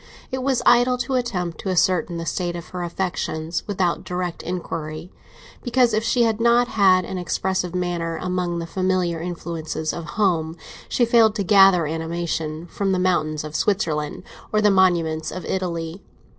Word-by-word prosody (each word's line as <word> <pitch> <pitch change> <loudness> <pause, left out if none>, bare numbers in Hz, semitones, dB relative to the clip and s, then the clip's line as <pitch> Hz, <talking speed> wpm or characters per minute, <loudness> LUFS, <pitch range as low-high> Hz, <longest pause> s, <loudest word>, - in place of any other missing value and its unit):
It 260 0 -2
was 265 -1 0
idle 245 +1 +5
to 265 +2 -3
attempt 195 -10 -2
to 195 - -4
ascertain 180 -2 +1
the 165 - -4
state 175 +1 -2
of 170 -1 -8
her 180 - -5
affections 170 -2 -3
without 185 -4 0
direct 180 -1 -3
inquiry, 165 -1 -5 0.5
because, 245 -2 +2
if 215 +1 +1
she 240 +1 +2
had 225 -1 +1
not 235 +1 +4
had 185 -3 +4
an 185 - -4
expressive 180 0 -1
manner 175 -2 -2
among 180 -1 -2
the 170 - -3
familiar 185 -2 0
influences 160 -2 -4
of 170 - -6
home, 170 -6 +1 0.3
she 240 - +2
failed 225 -2 +4
to 205 - -1
gather 195 -3 +6
animation 160 0 -3
from 195 +3 -1
the - - +1
mountains 155 -5 0
of 155 0 -7
Switzerland 160 -8 -1 0.3
or 215 - +2
the 210 -1 +4
monuments 170 -4 +2
of 185 - -6
Italy. 170 -1 -3
180 Hz, 165 wpm, -22 LUFS, 165-200 Hz, 0.5 s, gather